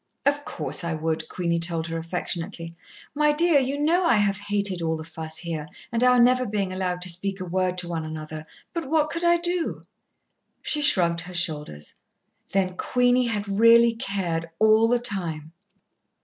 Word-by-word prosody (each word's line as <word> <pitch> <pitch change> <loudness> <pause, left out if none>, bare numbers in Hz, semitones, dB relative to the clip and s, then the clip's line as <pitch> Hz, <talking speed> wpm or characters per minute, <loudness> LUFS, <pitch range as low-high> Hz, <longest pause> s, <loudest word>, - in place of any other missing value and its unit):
"Of 285 +1 +1
course, - - -3
I 170 -1 -2
would," 160 0 -3
Queenie 170 -2 -1
told 165 -1 -1
her 165 0 -4
affectionately. 165 0 -4 0.4
"My 300 +1 +3
dear, 320 0 +4
you 270 +2 -2
know 335 +5 +2
I 335 - +4
have 205 -2 +1
hated 205 -3 -1
all 160 -1 -1
the 160 - -7
fuss 160 0 -5
here, 160 -3 -4 0.2
and 235 +1 +1
our 250 0 +5
never 250 +1 +4
being 200 -2 -2
allowed 180 -1 -2
to 185 - -2
speak 195 +3 -1
a 185 - -4
word 185 +1 -1
to 180 -1 0
one 165 -2 -3
another. 155 0 -7 0.3
But 335 -6 -4
what 310 -1 +2
could 335 +1 -4
I 345 0 +4
do?" 345 0 -2 0.8
She 300 - +1
shrugged 170 - +3
her 180 +1 -9
shoulders. 150 - -2 0.6
Then 185 -2 0
Queenie 250 0 +2
had 210 -3 -2
really 230 0 +6
cared 190 -8 -3
all 220 +1 +5
the 245 +1 +3
time! 170 -9 -2
190 Hz, 175 wpm, -24 LUFS, 165-245 Hz, 0.8 s, really